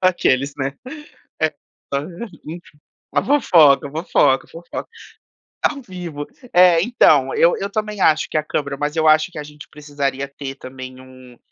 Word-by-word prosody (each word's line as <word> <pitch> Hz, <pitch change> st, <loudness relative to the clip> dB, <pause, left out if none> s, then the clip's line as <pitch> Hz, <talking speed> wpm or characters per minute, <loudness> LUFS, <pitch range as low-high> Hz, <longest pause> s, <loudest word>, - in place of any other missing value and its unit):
Aqueles, 140 Hz, -7 st, +2 dB
né. 135 Hz, 0 st, -3 dB, 0.7 s
É 155 Hz, -1 st, +2 dB, 0.4 s
hã, 140 Hz, +1 st, -1 dB, 0.4 s
enfim. 160 Hz, -2 st, -10 dB, 0.4 s
A -, -, +3 dB
fofoca, 160 Hz, -, +4 dB
a -, -, -12 dB
fofoca, 145 Hz, -4 st, +2 dB
a -, -, -28 dB
fofoca. 170 Hz, +1 st, -8 dB, 0.8 s
Ao 280 Hz, -2 st, 0 dB
vivo. 175 Hz, -, -7 dB, 0.3 s
É, 175 Hz, -2 st, +6 dB
então, 155 Hz, -, +3 dB
eu 170 Hz, -, +4 dB
eu 200 Hz, +1 st, -4 dB
também 210 Hz, -2 st, -3 dB
acho 155 Hz, 0 st, +3 dB
que -, -, -1 dB
é -, -, +4 dB
a -, -, -17 dB
câmera, 140 Hz, -2 st, -3 dB
mas 145 Hz, +2 st, -2 dB
eu 160 Hz, -1 st, +2 dB
acho 155 Hz, +3 st, +4 dB
que 165 Hz, -, -7 dB
a -, -, -5 dB
gente 150 Hz, 0 st, -13 dB
precisaria 140 Hz, -2 st, -3 dB
ter 140 Hz, -1 st, -8 dB
também 130 Hz, -1 st, -10 dB
um 130 Hz, -1 st, -15 dB
150 Hz, 170 wpm, -20 LUFS, 140-175 Hz, 0.8 s, É